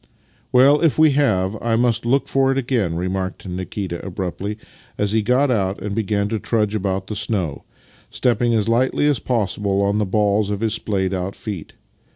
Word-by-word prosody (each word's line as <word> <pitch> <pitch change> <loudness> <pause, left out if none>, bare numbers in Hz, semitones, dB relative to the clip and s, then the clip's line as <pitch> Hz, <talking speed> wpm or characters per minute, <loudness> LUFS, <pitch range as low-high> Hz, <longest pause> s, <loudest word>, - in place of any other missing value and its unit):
" - - -35
Well, 135 +4 +5
if 165 -4 +2
we 155 -1 +6
have, 110 -9 +1
I 115 -1 +1
must 120 0 +1
look 135 +3 +2
for 135 0 +2
it 135 - -1
again," 120 -10 0
re 90 +2 -2
marked 95 +1 -4
Nikita 90 0 -5
abruptly 95 +2 -4 0.4
as 105 -1 0
he 110 0 +2
got 125 +5 +2
out 100 -4 0
and 105 -1 -4
began 105 -1 0
to 110 0 -2
trudge 105 -1 0
about 95 -2 -1
the 105 - -5
snow, 90 -10 -2 0.4
stepping 120 -1 +1
as 110 -1 +1
lightly 125 +5 +2
as 145 -5 +2
possible 100 -4 -1
on 100 +1 +1
the 105 - +1
balls 105 +1 +1
of 100 0 -3
his 110 -2 +1
splayed 95 -4 -1
out 95 +1 -3
feet. 100 -8 -7
105 Hz, 190 wpm, -21 LUFS, 95-120 Hz, 0.4 s, we